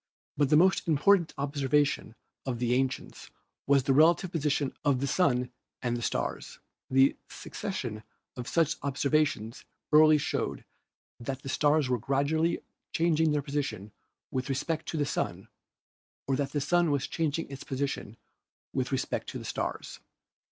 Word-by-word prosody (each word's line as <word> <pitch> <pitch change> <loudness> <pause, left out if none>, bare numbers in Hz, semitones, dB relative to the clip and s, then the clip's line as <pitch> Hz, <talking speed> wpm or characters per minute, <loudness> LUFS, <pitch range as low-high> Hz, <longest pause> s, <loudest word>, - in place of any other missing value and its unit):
But 145 -2 +2
the 150 - +6
most 185 +3 +4
important 170 +3 +4
observation 140 -3 0 0.3
of 125 -2 -1
the 120 0 0
ancients 130 0 -2 0.4
was 140 -1 +4
the 135 - +2
relative 165 +5 +4
position 150 -4 0
of 140 -3 +2
the 140 - 0
Sun 125 -4 +1 0.3
and 120 -1 0
the 120 - -4
stars. - - -3 0.3
A 135 +1 +5
succession 120 - -5 0.3
of 125 -2 -6
such 165 -2 +1
observations 140 -4 0 0.3
early 155 0 +7
showed 145 - -2 0.5
that 130 +2 -5
the 135 - -6
stars 145 0 +3
were 125 -1 0
gradually 140 +7 +1 0.3
changing 160 -2 +2
their 150 -1 0
position 140 -8 -3 0.4
with 130 +1 -2
respect 155 +4 -2
to 160 - -3
the 145 - +1
Sun - - -3 0.8
or 135 - +1
that 140 0 -2
the 145 - 0
Sun 175 +3 +2
was 140 -2 +1
changing 165 0 -1
its 135 - -7
posi 140 +1 -1
tion 110 -4 -7 0.6
with - - -1
respect - - -2
to - - -5
the - - -8
stars. - - -4
140 Hz, 150 wpm, -29 LUFS, 130-155 Hz, 0.8 s, early